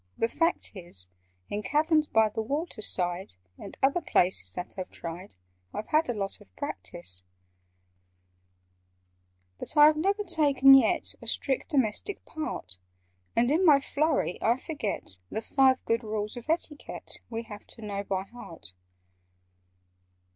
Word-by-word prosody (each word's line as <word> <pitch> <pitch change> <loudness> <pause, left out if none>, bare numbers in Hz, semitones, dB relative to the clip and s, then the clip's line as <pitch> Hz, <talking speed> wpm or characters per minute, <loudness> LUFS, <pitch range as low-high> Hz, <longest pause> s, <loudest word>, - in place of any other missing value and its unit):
The 230 - +2
fact 330 +8 0
is, 170 - -3 0.4
In 205 - -3
caverns 305 +4 +2
by 220 -4 +4
the 220 - -3
water 280 +1 -3
side, 180 - -1 0.3
And 200 - -9
other 280 +6 +3
places 185 - +2
that 180 - -5
I've 185 - -4
tried, 170 - -7 0.4
I've 215 - -5
had 310 -2 +3
a 245 - 0
lot 195 -2 -4
of 90 - -15
practice: 90 +1 -5 2.4
"But - - -7
I 295 - +10
have 305 0 +5
never 400 +6 +1
taken 285 -7 +5
yet 270 - +4
A - - -10
strict 265 -2 -1
domestic 275 - -1
part, 305 - -5 0.6
And 240 +3 +3
in 330 +5 +3
my 300 -6 +7
flurry 285 - 0
I 230 +3 +3
forget 225 - -4
The 220 - -4
Five 265 0 +3
Good 230 +1 +1
Rules 215 -1 -3
of 245 +4 -9
Etiquette 320 -2 -3
We 230 0 -4
have 210 -2 -11
to 230 - -13
know 200 -1 -3
by 190 -1 -2
heart." 170 - -12
230 Hz, 145 wpm, -28 LUFS, 200-300 Hz, 2.4 s, I